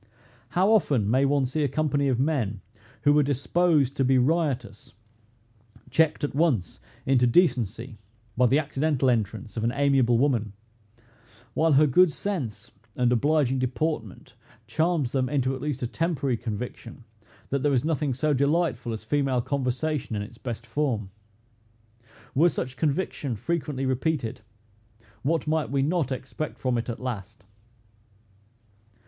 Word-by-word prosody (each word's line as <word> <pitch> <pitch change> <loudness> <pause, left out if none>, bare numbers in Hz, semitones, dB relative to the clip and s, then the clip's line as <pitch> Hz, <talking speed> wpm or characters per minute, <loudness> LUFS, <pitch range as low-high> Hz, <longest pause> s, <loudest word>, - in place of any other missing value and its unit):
How 190 +4 +4
often 140 - +3
may 130 +3 +3
one 140 -1 +2
see 150 +4 -1
a - - +2
company 145 0 0
of 125 -3 +1
men, 125 -9 0 0.4
who 145 - +5
were 150 - +5
disposed 145 0 +1
to 135 - +2
be 130 0 +3
riotous, 130 - -1 1.0
checked 160 -2 +2
at 145 - -1
once 135 - 0 0.3
into 125 -2 +3
decency 120 - +1 0.4
by 125 +1 +4
the 135 - +3
accidental 145 -3 +1
entrance 115 0 -3
of 110 - -1
an 115 - +1
amiable 135 -4 +3
woman; 115 -6 +1 1.0
while 160 +3 +3
her 145 +3 +6
good 160 +5 +5
sense 155 - -4 0.2
and 125 -1 +2
obliging 135 +1 +2
deportment 130 - -3 0.3
charms 160 -6 0
them 130 -2 0
into 135 -2 0
at 130 - -6
least 145 -4 -3
a - - 0
temporary 140 -3 -1
conviction, 115 +1 -6 0.5
that 140 -1 0
there 145 - +2
is 130 0 +1
nothing 150 -4 0
so 150 +3 +1
delightful 140 -4 0
as 110 - -6
female 135 -3 +1
conversation, 135 0 -2
in 105 - -2
its 115 +3 -12
best 120 -2 -6
form! 115 -6 -2 1.2
Were 165 +6 +5
such 130 -5 -4
conviction 145 -4 -1
frequently 145 +2 -2
repeated, 130 -3 -1 0.8
what 160 +5 0
might 155 0 0
we 135 0 +1
not 155 -2 0
expect 130 +4 -5
from 125 -2 0
it 115 - -5
at 115 - -4
last? 110 -6 -6
135 Hz, 145 wpm, -26 LUFS, 120-150 Hz, 1.2 s, her